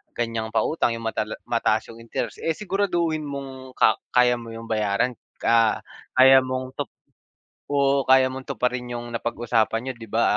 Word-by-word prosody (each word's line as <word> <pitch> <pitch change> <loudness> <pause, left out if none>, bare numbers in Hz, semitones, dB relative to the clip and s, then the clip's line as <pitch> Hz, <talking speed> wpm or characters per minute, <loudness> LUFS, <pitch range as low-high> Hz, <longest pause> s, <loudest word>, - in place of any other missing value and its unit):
ganiyang 115 -1 -3
pautang 120 -3 +1
yung 115 - -7
matala 115 - -2
mataas - - 0
yung 115 - -13
interest, 115 - -4
eh 165 -1 -1
siguraduhin 175 -6 -1
mong 135 -2 -7
ka - - +4 0.2
kaya 125 -1 +4
mo 115 - -10
yung 115 - -8
bayaran. 110 +3 0 0.2
Ah, 115 -1 +3 0.3
kaya 130 +1 +8
mong 130 0 -4
tup - - -1 0.8
oo, 140 -1 +2
kaya 130 0 +5
mong 130 0 -8
tuparin 125 0 -1
yung 120 0 -7
napag-usapan 115 -1 0
niyo, 130 - -3
'di 115 -1 -10
ba? - - +1
125 Hz, 160 wpm, -24 LUFS, 115-135 Hz, 0.8 s, kaya